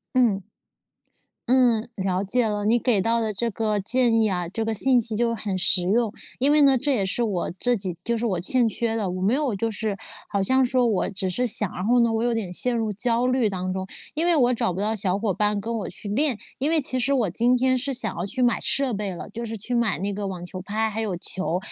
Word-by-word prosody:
嗯。 225 Hz, -6 st, +2 dB, 1.1 s
嗯， 245 Hz, -3 st, +2 dB
了 190 Hz, -1 st, -2 dB
解 230 Hz, +4 st, +1 dB
了， 210 Hz, -1 st, -3 dB
你 225 Hz, +3 st, +2 dB
给 235 Hz, -4 st, +1 dB
到 230 Hz, +3 st, 0 dB
的 220 Hz, -1 st, -2 dB
这 230 Hz, +4 st, -1 dB
个 215 Hz, -1 st, -1 dB
建 240 Hz, +3 st, +3 dB
议 215 Hz, -2 st, +1 dB
啊， 180 Hz, -2 st, -2 dB
这 225 Hz, +5 st, -3 dB
个 225 Hz, -, -2 dB
信 250 Hz, +3 st, +4 dB
息 225 Hz, -1 st, +1 dB
就 230 Hz, +1 st, 0 dB
很 200 Hz, -3 st, -4 dB
实 180 Hz, 0 st, +5 dB
用。 225 Hz, 0 st, +1 dB, 0.3 s
因 275 Hz, +3 st, +2 dB
为 300 Hz, -, +4 dB
呢， 275 Hz, -2 st, +4 dB
这 285 Hz, +3 st, 0 dB
也 205 Hz, -6 st, 0 dB
是 190 Hz, +6 st, +1 dB
我 195 Hz, -6 st, -2 dB
自己 195 Hz, -2 st, -1 dB
就 235 Hz, 0 st, 0 dB
是 230 Hz, -, -3 dB
我 185 Hz, -6 st, -2 dB
欠 240 Hz, +6 st, +3 dB
缺 225 Hz, +1 st, -2 dB
的， 210 Hz, -5 st, -2 dB
我 185 Hz, +1 st, -5 dB
没 200 Hz, +6 st, +1 dB
有 280 Hz, -3 st, -1 dB
就 225 Hz, +4 st, -2 dB
是 215 Hz, -1 st, -2 dB, 0.3 s
好 200 Hz, -, -2 dB
像 260 Hz, +7 st, +3 dB
说 250 Hz, 0 st, +1 dB
我 210 Hz, -4 st, 0 dB
只 190 Hz, -1 st, -3 dB
是 190 Hz, +7 st, -1 dB
想， 210 Hz, -3 st, +5 dB
然 185 Hz, -, -5 dB
后 245 Hz, +4 st, +2 dB
呢， 235 Hz, -1 st, +2 dB
我 225 Hz, 0 st, -1 dB
有 240 Hz, 0 st, 0 dB
点 215 Hz, -6 st, -3 dB
陷 245 Hz, +6 st, +3 dB
入 220 Hz, -2 st, -2 dB
焦 235 Hz, +4 st, 0 dB
虑 255 Hz, -4 st, +1 dB
当 185 Hz, -1 st, -4 dB
中， 190 Hz, 0 st, -4 dB, 0.3 s
因 315 Hz, +3 st, -1 dB
为 345 Hz, -1 st, +3 dB
我 250 Hz, -3 st, +3 dB
找 185 Hz, -, -1 dB
不 180 Hz, -, -5 dB
到 215 Hz, +2 st, -1 dB
小 195 Hz, -2 st, 0 dB
伙 205 Hz, -2 st, -2 dB
伴 210 Hz, +2 st, 0 dB
跟 230 Hz, +3 st, -5 dB
我 195 Hz, -5 st, -5 dB
去 190 Hz, -, -10 dB
练。 255 Hz, +2 st, +1 dB, 0.2 s
因 285 Hz, +4 st, -1 dB
为 325 Hz, -1 st, +4 dB
其 255 Hz, -2 st, -1 dB
实 260 Hz, +3 st, +3 dB
我 245 Hz, -7 st, +1 dB
今 235 Hz, +8 st, +1 dB
天 255 Hz, +1 st, +1 dB
是 275 Hz, +2 st, -2 dB
想 250 Hz, -, +1 dB
要 175 Hz, -, -4 dB
去 255 Hz, +7 st, -4 dB
买 245 Hz, -2 st, +1 dB
设 275 Hz, -4 st, +3 dB
备 205 Hz, -1 st, -3 dB
了， 175 Hz, -, -8 dB
就 230 Hz, +4 st, -7 dB
是 225 Hz, -1 st, -5 dB
去 220 Hz, +4 st, -5 dB
买 235 Hz, -3 st, 0 dB
那 200 Hz, +2 st, -3 dB
个 200 Hz, 0 st, -4 dB
网 180 Hz, -2 st, -7 dB
球 185 Hz, +1 st, -7 dB
拍， 215 Hz, +3 st, -2 dB
还 220 Hz, +1 st, -4 dB
有 210 Hz, -5 st, -3 dB
球， 180 Hz, 0 st, -2 dB
225 Hz, 280 characters per minute, -23 LUFS, 195-245 Hz, 1.1 s, 实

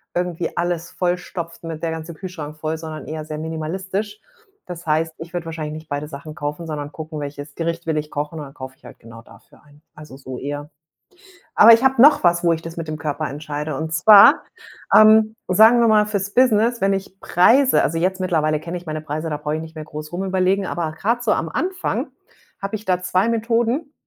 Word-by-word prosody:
irgendwie 175 Hz, -1 st, -2 dB
alles 170 Hz, -1 st, -2 dB
vollstopft 175 Hz, -2 st, -4 dB
mit 160 Hz, -2 st, -6 dB
der 165 Hz, -, 0 dB
ganze 160 Hz, +1 st, -6 dB
Kühlschrank 155 Hz, -3 st, -8 dB
voll, 155 Hz, +1 st, -3 dB
sondern 160 Hz, -1 st, -8 dB
eher 155 Hz, 0 st, -5 dB
sehr 155 Hz, 0 st, -6 dB
minimalistisch. 190 Hz, +7 st, -4 dB, 0.5 s
Das 175 Hz, -1 st, -8 dB
heißt, 160 Hz, +1 st, 0 dB
ich 165 Hz, +1 st, -10 dB
würde 175 Hz, -2 st, -4 dB
wahrscheinlich 155 Hz, -2 st, -5 dB
nicht 155 Hz, 0 st, -10 dB
beide 145 Hz, +1 st, -3 dB
Sachen 150 Hz, +1 st, -9 dB
kaufen, 150 Hz, +3 st, -5 dB
sondern 145 Hz, -2 st, -5 dB
gucken, 155 Hz, -1 st, -7 dB
welches 145 Hz, 0 st, -7 dB
Gericht 170 Hz, 0 st, -3 dB
will 160 Hz, -1 st, 0 dB
ich 150 Hz, 0 st, -4 dB
kochen 150 Hz, +2 st, -4 dB
und 150 Hz, -, -6 dB
dann 135 Hz, -, -13 dB
kaufe 130 Hz, -1 st, -9 dB
ich -, -, -23 dB
halt -, -, -13 dB
genau 115 Hz, 0 st, -13 dB
dafür -, -, -20 dB
ein. 145 Hz, 0 st, -22 dB
Also 150 Hz, -3 st, -12 dB
so 130 Hz, -2 st, -8 dB
eher. 145 Hz, +2 st, -5 dB, 0.9 s
Aber 230 Hz, +2 st, +9 dB
ich 230 Hz, +3 st, +5 dB
habe 265 Hz, -2 st, +4 dB
noch 290 Hz, -5 st, +6 dB
was, 170 Hz, 0 st, +3 dB
wo 170 Hz, -1 st, +3 dB
ich 165 Hz, 0 st, -2 dB
das 165 Hz, 0 st, -8 dB
mit 165 Hz, -2 st, -6 dB
dem 155 Hz, 0 st, -4 dB
Körper 150 Hz, 0 st, -3 dB
entscheide. 150 Hz, 0 st, -5 dB
Und 160 Hz, +2 st, -4 dB
zwar, 200 Hz, +5 st, +7 dB, 0.5 s
ähm, 220 Hz, 0 st, +6 dB
sagen 220 Hz, +6 st, +6 dB
wir 235 Hz, -, +4 dB
mal 215 Hz, -1 st, +4 dB
fürs 200 Hz, -1 st, -3 dB
Business, 235 Hz, -1 st, +3 dB
wenn 195 Hz, 0 st, +2 dB
ich 195 Hz, 0 st, -6 dB
Preise 255 Hz, +10 st, +4 dB
also, 165 Hz, -, -1 dB
jetzt 185 Hz, +3 st, 0 dB
mittlerweile 155 Hz, -4 st, +1 dB
kenne 170 Hz, +3 st, -6 dB
ich 175 Hz, 0 st, -9 dB
meine 155 Hz, 0 st, -4 dB
Preise, 155 Hz, +2 st, -4 dB
da 150 Hz, -, -2 dB
brauche 150 Hz, 0 st, -3 dB
ich 155 Hz, -, -3 dB
nicht 160 Hz, 0 st, -10 dB
mehr 155 Hz, -, -6 dB
groß 150 Hz, 0 st, -8 dB
rum 180 Hz, +2 st, -3 dB
überlegen, 190 Hz, +1 st, +1 dB
aber 170 Hz, -3 st, -2 dB
grad 230 Hz, +9 st, -1 dB
so 235 Hz, -, 0 dB
am 165 Hz, -, -1 dB
Anfang 360 Hz, -, -2 dB, 0.5 s
habe 195 Hz, +2 st, -4 dB
ich 215 Hz, 0 st, -5 dB
da 185 Hz, -2 st, 0 dB
2 185 Hz, +3 st, +1 dB
Methoden, 235 Hz, +6 st, 0 dB
165 Hz, 215 wpm, -21 LUFS, 155-195 Hz, 0.9 s, Aber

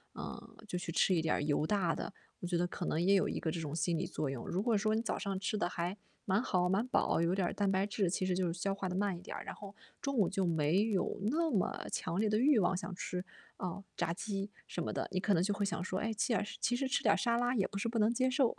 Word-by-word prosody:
嗯， -, -, -8 dB
就 180 Hz, -, -2 dB
去 170 Hz, -, -4 dB
吃 185 Hz, -, +3 dB
一 165 Hz, -, +2 dB
点 155 Hz, -2 st, +1 dB
油 150 Hz, +1 st, +2 dB
大 190 Hz, -5 st, +2 dB
的， -, -, -4 dB, 0.3 s
我 175 Hz, -, -3 dB
觉 175 Hz, -1 st, +1 dB
得 175 Hz, -, +2 dB
可 175 Hz, -, -5 dB
能 160 Hz, -, 0 dB
也 195 Hz, +3 st, +4 dB
有 190 Hz, -, +3 dB
一 -, -, -2 dB
个 160 Hz, -, -1 dB
这 165 Hz, -, -3 dB
种 150 Hz, -1 st, -4 dB
心 165 Hz, +1 st, +1 dB
理 175 Hz, -, -1 dB
作 150 Hz, -, -2 dB
用。 130 Hz, -3 st, -5 dB
如 185 Hz, -, 0 dB
果 235 Hz, -2 st, +3 dB
说 215 Hz, +2 st, +2 dB
你 225 Hz, -, +1 dB
早 230 Hz, -, -2 dB
上 195 Hz, -1 st, -2 dB
吃 210 Hz, +2 st, -1 dB
的 190 Hz, -, 0 dB
还 180 Hz, +2 st, -2 dB, 0.3 s
蛮 195 Hz, +2 st, +2 dB
好、 180 Hz, -1 st, +2 dB
蛮 195 Hz, +6 st, +2 dB
饱， 165 Hz, -, +2 dB
有 170 Hz, +1 st, +2 dB
点 185 Hz, -3 st, 0 dB
蛋 200 Hz, -1 st, +1 dB
白 190 Hz, +1 st, +2 dB
质， 200 Hz, -3 st, 0 dB
其 185 Hz, -, 0 dB
实 185 Hz, -1 st, +1 dB
就 185 Hz, -1 st, +1 dB
是 165 Hz, -, 0 dB
消 195 Hz, +3 st, -1 dB
化 195 Hz, -1 st, -3 dB
地 180 Hz, -, -3 dB
慢 195 Hz, -2 st, 0 dB
一 -, -, -11 dB
点， -, -, -6 dB
然 -, -, -5 dB
后 200 Hz, -1 st, -9 dB, 0.3 s
中 275 Hz, -1 st, -1 dB
午 200 Hz, -, +4 dB
就 195 Hz, 0 st, 0 dB
没 165 Hz, +3 st, +3 dB
有 195 Hz, -4 st, 0 dB
那 320 Hz, +9 st, +2 dB
么 195 Hz, -, 0 dB
强 175 Hz, -, -1 dB
烈 215 Hz, -, +3 dB
的 215 Hz, 0 st, +2 dB
欲 265 Hz, +1 st, +5 dB
望， 190 Hz, -1 st, +2 dB
想 185 Hz, 0 st, -4 dB
吃， 180 Hz, 0 st, -3 dB, 0.3 s
呃， 185 Hz, +1 st, -4 dB
炸 165 Hz, -, 0 dB
鸡 200 Hz, +1 st, -3 dB, 0.2 s
什 -, -, -4 dB
么 -, -, -2 dB
的。 -, -, -2 dB
你 185 Hz, -, 0 dB
可 205 Hz, -, +2 dB
能 170 Hz, -, +3 dB
就 205 Hz, +2 st, +1 dB
会 205 Hz, -, -1 dB
想 195 Hz, -, -2 dB
说， 185 Hz, 0 st, -2 dB
诶， 225 Hz, 0 st, -1 dB
其 220 Hz, +3 st, +1 dB
耳 220 Hz, -, +2 dB
是 205 Hz, -, -7 dB
其 245 Hz, +1 st, +1 dB
实 270 Hz, +2 st, 0 dB
吃 265 Hz, -, +2 dB
点 -, -, +5 dB
沙 235 Hz, -3 st, +2 dB
拉 245 Hz, +1 st, +1 dB
也 200 Hz, -5 st, +2 dB
不 200 Hz, -, -6 dB
是 200 Hz, -, -1 dB
不 230 Hz, 0 st, -2 dB
能 220 Hz, +2 st, +4 dB
接 255 Hz, +2 st, +2 dB
受。 255 Hz, -2 st, +2 dB
195 Hz, 315 characters per minute, -34 LUFS, 175-215 Hz, 0.3 s, 欲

